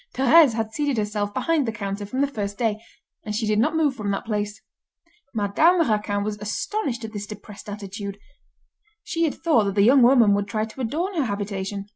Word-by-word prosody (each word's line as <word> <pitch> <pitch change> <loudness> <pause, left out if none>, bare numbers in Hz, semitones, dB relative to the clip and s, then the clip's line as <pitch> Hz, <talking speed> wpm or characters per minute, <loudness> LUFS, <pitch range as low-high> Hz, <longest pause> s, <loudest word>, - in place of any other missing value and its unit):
Thérèse 270 -1 +6
had 220 -1 -2
seated 290 -4 -1
herself 210 -1 -1
behind 305 +4 0
the - - 0
counter 200 -1 -5
from 255 +6 -2
the 280 - +3
first 205 -7 -4
day, 220 -2 -1 0.4
and 210 0 -4
she 220 +1 -1
did 210 0 +1
not 305 +8 +2
move 305 -4 +2
from 210 -4 -4
that 195 - -2
place. 210 -1 -3 0.7
Madame 310 - +3
Raquin 210 -2 0
was 210 0 -4
astonished 235 - -3
at 220 - -9
this 205 -1 -5
depressed 210 0 -10
attitude. 200 -1 -6 0.9
She 335 0 0
had 305 - -1
thought 310 -11 +2
that 200 -1 -2
the 200 - +4
young 260 +5 +6
woman 240 -4 +6
would 200 0 0
try 215 +1 -1
to 225 +4 -9
adorn 325 - -2
her 295 - +2
habitation. 200 -1 -4
215 Hz, 200 wpm, -24 LUFS, 205-265 Hz, 0.9 s, Thérèse